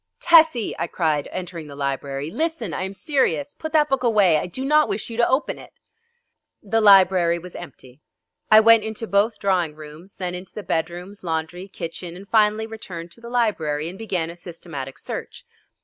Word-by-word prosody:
"Tessie!" 320 -9 +5
I - - -1
cried, 155 -5 -1
entering 175 -4 -6
the 140 - -10
library, 140 +1 -3
"listen, 310 - -2
I - - -3
am 190 +1 -3
serious. 285 +5 0
Put 315 - -7
that 300 -1 +4
book 270 -2 0
away. 205 -10 +4
I - - -4
do 260 +10 -5
not 300 -3 +4
wish 205 +3 -4
you 225 - -6
to 235 - +3
open 260 +4 0
it!" - - -14 0.9
The 225 +2 +1
library 185 -4 +6
was 175 +1 -11
empty. 130 +1 -11 0.5
I 215 0 +8
went 230 -1 +6
into 220 +1 -4
both 210 +2 +1
drawing 180 -6 0
rooms, 155 +5 -12
then 180 -1 -4
into 180 +1 -9
the 210 - -6
bedrooms, 175 +5 -4
laundry, 170 +2 -3
kitchen, 175 -2 -7
and 195 +2 -11
finally 215 0 +3
returned 180 -7 -8
to 230 - -16
the 235 - -9
library 165 -11 0
and 185 - -11
began 180 -7 -2
a - - -11
systematic 165 -6 -8
search. - - -7
190 Hz, 185 wpm, -22 LUFS, 165-225 Hz, 0.9 s, I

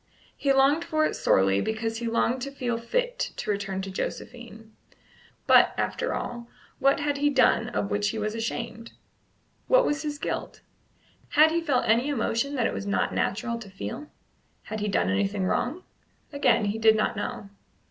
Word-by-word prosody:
He 280 - +1
longed 275 +4 +4
for 310 -2 +1
it - - -1
sorely, 95 +1 +3
because 225 +1 -2
he 235 - -3
longed 230 +2 +1
to 275 - -3
feel 245 -4 -2
fit - - -2 0.2
to 215 - -2
return 195 -1 -3
to 195 - -6
Josephine. 225 +2 -6 0.7
But, - - +6
after - - -1
all, 240 -1 -5 0.3
what 275 +1 +3
had 290 -1 0
he 290 +1 +2
done 250 -4 +3
of 205 -4 -2
which 205 0 +1
he 225 - -4
was 215 0 -2
ashamed? 230 0 -5 0.7
What - - +5
was 295 +1 0
his 295 -1 -4
guilt? - - -4 0.7
Had 315 0 +5
he 335 +1 +1
felt 285 -6 +1
any 235 +6 +3
emotion 275 +1 -1
that 245 -4 +1
it - - 0
was 200 - -5
not 200 - 0
natural 230 +4 -1
to 215 -4 -10
feel? 195 +9 -6 0.6
Had 215 0 -5
he 210 - -2
done 95 - +1
anything 195 - 0
wrong? 275 - -1 0.5
Again 250 -6 +3
he 205 +2 -2
did 220 -1 +5
not 215 +1 0
know. 200 -1 -5
230 Hz, 180 wpm, -26 LUFS, 210-280 Hz, 0.7 s, But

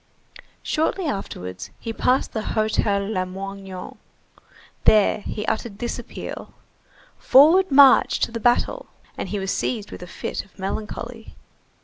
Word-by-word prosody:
Shortly 330 +4 0
afterwards, 90 - -5
he 225 - -5
passed 255 +3 +1
the 220 - -2
Hotel 215 -2 0
Lamoignon. 195 -1 -5 0.9
There 210 -1 +5
he 210 +1 -5
uttered 220 -2 -3
this 240 +2 -3
appeal:— 240 - -8 0.6
"Forward 330 +8 +6
march 275 -1 +6
to - - +1
the 230 - -4
battle!" 245 - +1 0.3
And - - -5
he 210 - -2
was 195 0 -2
seized 215 -5 -2
with - - -9
a 180 - -8
fit - - -5
of 195 - -25
melancholy. 220 +4 -6
215 Hz, 130 wpm, -23 LUFS, 195-250 Hz, 0.9 s, Forward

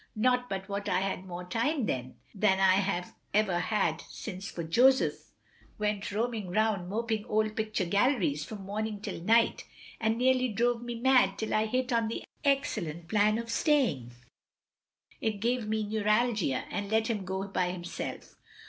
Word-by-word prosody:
Not 250 +2 +2
but 190 -1 -4
what 200 0 -3
I 185 - +2
had 190 -1 -2
more 175 0 -6
time 235 - 0
then 130 -7 -3 0.2
than 195 -2 +2
I 190 -1 +5
have 190 -2 -1 0.2
ever 200 -5 +3
had 180 -4 0
since, 195 -2 -6
for 170 - -5
Joseph 255 +11 +3 0.5
went 210 -1 -1
roaming 220 -2 -2
round 205 -2 +1
moping 220 0 -1
old 215 -1 0
picture 215 -3 -1
galleries 200 - +2
from 200 +3 -8
morning 210 +1 -3
till 200 - -6
night, 230 +5 +3 0.4
and 220 0 +1
nearly 255 0 +3
drove 235 +2 +1
me 240 0 -5
mad 250 -6 +4
till 220 - -3
I 215 +1 +2
hit 255 +2 0
on 230 -1 +2
the 225 - -4 0.2
excellent 175 - -1
plan 215 +1 +3
of 230 0 -4
saying 230 - +1 1.1
it 220 - +1
gave 235 +1 0
me 220 0 0
neuralgia, 210 - +1
and 200 -1 -3
let 220 +1 +2
him 220 -4 -2
go 190 +1 -3
by 185 -2 0
himself. 175 -1 -6
215 Hz, 165 wpm, -30 LUFS, 190-230 Hz, 1.1 s, I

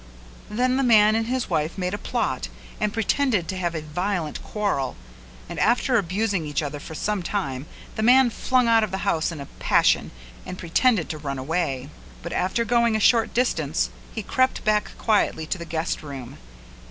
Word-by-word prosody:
Then 250 +4 +1
the 270 - +2
man 215 -3 +6
and 225 0 0
his 255 0 -1
wife 155 +4 -1
made 180 0 -2
a - - -1
plot - - -2 0.3
and 210 -1 0
pretended 225 - +1
to 190 - -4
have 175 -2 -2
a 155 - -3
violent 175 +1 -2
quarrel 200 - -2 0.5
and - - -6
after 245 +1 +3
abusing 195 0 -1
each 150 0 -2
other 145 0 -4
for 160 +1 -9
some 210 +4 -1
time 155 -8 -3 0.3
the - - -2
man 250 +2 +5
flung 255 +1 +1
out 225 -1 +5
of 215 - -1
the 190 +1 -4
house 165 -4 +1
in 165 - -7
a 140 - -6
passion - - +3 0.3
and 185 - -7
pretended 185 +2 +2
to 155 - -4
run 140 -2 -4
away; 140 -1 -2 0.3
but 170 - -5
after 210 +6 0
going 235 0 +3
a - - +2
short 225 +1 +3
distance 165 - 0 0.2
he 220 - -5
crept 260 +5 +1
back 215 -1 +1
quietly 205 -7 +1
to 175 - -3
the 170 - -6
guest 165 +1 -2
room. 135 -5 -8
195 Hz, 190 wpm, -24 LUFS, 160-225 Hz, 0.5 s, man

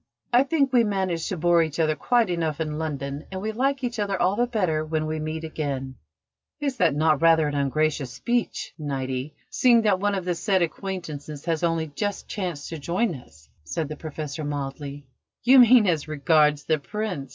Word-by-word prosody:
"I 245 - +7
think 275 -1 +1
we 240 -2 +6
manage 190 -6 -1
to 185 - -3
bore 170 +1 +4
each 160 0 -2
other 155 -1 +2
quite 235 +1 +2
enough 160 -3 -1
in 155 -1 -2
London, 140 -2 -4
and 190 - -4
we 215 +3 -2
like 270 +4 0
each 240 -2 -2
other 200 -2 -1
all 185 +3 +2
the 245 +3 +1
better 180 -10 0
when 155 0 -2
we 155 0 -3
meet 155 +1 -4
again." 140 -4 -4 0.7
"Is 280 -3 -2
not 155 - +4
that 155 -1 +2
rather 165 -2 +5
an 145 - -3
ungracious 140 -1 0
speech, 240 - -2
Niti, 135 -1 -3 0.2
seeing 240 -4 +4
that 200 -4 +3
one 205 +1 +1
of 190 -2 -3
the 180 - +1
said 185 +1 +1
acquaintances 155 -5 -5
has 165 -2 0
only 165 -2 +1
just 205 +5 -3
chanced 175 -8 -4
to 165 - -6
join 180 +7 0
us?" 80 - -13 0.2
said 160 - -3
the 155 - -5
Professor 155 -1 -6
mildly. 145 0 -5 0.4
"You 260 +2 +7
mean 240 -2 +7
as 165 -6 0
regards 150 0 +3
the 155 0 +1
Prince?" 185 -4 -4
160 Hz, 195 wpm, -25 LUFS, 150-205 Hz, 0.7 s, I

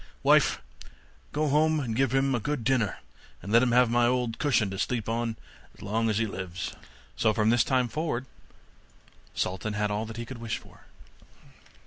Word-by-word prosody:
Wife, - - +4 0.7
go 150 +1 0
home, 155 +2 +3
and 120 -6 -3
give 135 0 +2
him 135 0 +2
a 120 - +1
good 145 +1 -2
dinner, 115 -4 +1 0.5
and 100 - -6
let 115 +1 +6
him 125 -1 +2
have 125 -1 +4
my 120 0 +4
old 125 -2 0
cushion 115 -9 +2
to 95 - -5
sleep 115 -1 -1
on 115 0 -2 0.4
as - - -13
long 110 +3 0
as 105 - 0
he 115 - +2
lives.' 95 -3 -5 0.4
So 110 -2 +2
from 110 0 +3
this 120 0 +4
time 130 -2 +1
forward 140 -2 -2 1.1
Sultan 95 +3 -2
had 105 0 -1
all 105 +2 -2
that 115 0 -8
he 120 - -4
could 120 0 -8
wish 115 -2 -2
for. - - -17
115 Hz, 185 wpm, -28 LUFS, 110-130 Hz, 1.1 s, let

